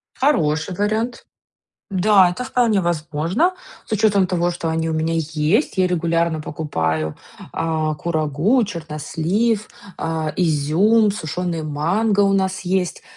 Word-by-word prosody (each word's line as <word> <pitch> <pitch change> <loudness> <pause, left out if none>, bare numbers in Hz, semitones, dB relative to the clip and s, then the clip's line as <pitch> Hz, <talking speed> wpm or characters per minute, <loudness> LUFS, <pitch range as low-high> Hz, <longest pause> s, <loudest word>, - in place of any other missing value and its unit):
Хороший 165 - +1
вариант. 215 +5 -1 0.7
Да, 190 -1 +4
это 215 +8 -5
вполне 235 -6 +2
возможно. 170 - 0 0.3
С - - -12
учётом 205 -3 +3
того, 175 -1 0
что 170 -1 -4
они 160 0 -1
у 160 - -1
меня 160 +1 0
есть, 160 - 0
я 185 -1 +3
регулярно 170 -2 0
покупаю, 80 - -2 0.4
а, 160 -1 -1
курагу, 160 - +1
чернослив, 170 +6 -2 0.3
а, 160 -1 -2
изюм, 180 +7 +3
сушёный 170 -2 -3
манго 180 +9 0
у 200 -1 +4
нас 190 -1 0
есть. 185 -1 -1
170 Hz, 125 wpm, -20 LUFS, 155-205 Hz, 0.7 s, Да